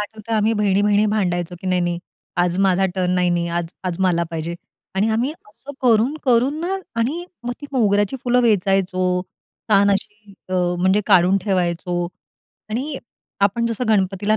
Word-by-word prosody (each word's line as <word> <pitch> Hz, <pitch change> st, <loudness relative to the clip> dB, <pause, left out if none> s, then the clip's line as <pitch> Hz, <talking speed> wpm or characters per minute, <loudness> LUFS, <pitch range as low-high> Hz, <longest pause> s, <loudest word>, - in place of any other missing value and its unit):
आठवतं 215 Hz, +1 st, -6 dB
आम्ही 215 Hz, +1 st, +2 dB
बहिणी-बहिणी 205 Hz, +1 st, +3 dB
भांडायचो 180 Hz, -4 st, -1 dB
की -, -, -7 dB
नाही-नाही, 175 Hz, -2 st, 0 dB, 0.4 s
"आज 175 Hz, 0 st, +1 dB
माझा 195 Hz, -1 st, +3 dB
टर्न," 185 Hz, -2 st, 0 dB
"नाही, 180 Hz, -1 st, +2 dB
नाही 170 Hz, 0 st, 0 dB
आज 175 Hz, -1 st, -1 dB, 0.2 s
आज 180 Hz, -1 st, -2 dB
मला 170 Hz, -2 st, +2 dB
पाहिजे." 165 Hz, +1 st, -4 dB, 0.4 s
आणि 200 Hz, +3 st, +2 dB
आम्ही 240 Hz, +7 st, 0 dB, 0.2 s
असं 275 Hz, +6 st, -11 dB
करून-करून 250 Hz, +3 st, +2 dB
ना 370 Hz, +3 st, -1 dB, 0.2 s
आणि 300 Hz, +10 st, -1 dB, 0.2 s
मग 245 Hz, -, -1 dB
ती 290 Hz, -, -7 dB
मोगऱ्याची 205 Hz, -2 st, +2 dB
फुलं 250 Hz, 0 st, +3 dB
वेचायचो. 185 Hz, -3 st, +1 dB, 0.5 s
छान 200 Hz, 0 st, +5 dB
अशी 205 Hz, +1 st, -4 dB, 0.2 s
अ, 185 Hz, -, -2 dB, 0.3 s
म्हणजे 190 Hz, +3 st, +3 dB
काढून 185 Hz, -1 st, +5 dB
ठेवायचो 175 Hz, -2 st, -1 dB, 0.6 s
आणि 270 Hz, +6 st, -3 dB, 0.4 s
आपण 205 Hz, +4 st, +2 dB
जसं 230 Hz, +2 st, -2 dB
गणपतीला 205 Hz, 0 st, +2 dB
200 Hz, 150 wpm, -21 LUFS, 180-225 Hz, 0.6 s, छान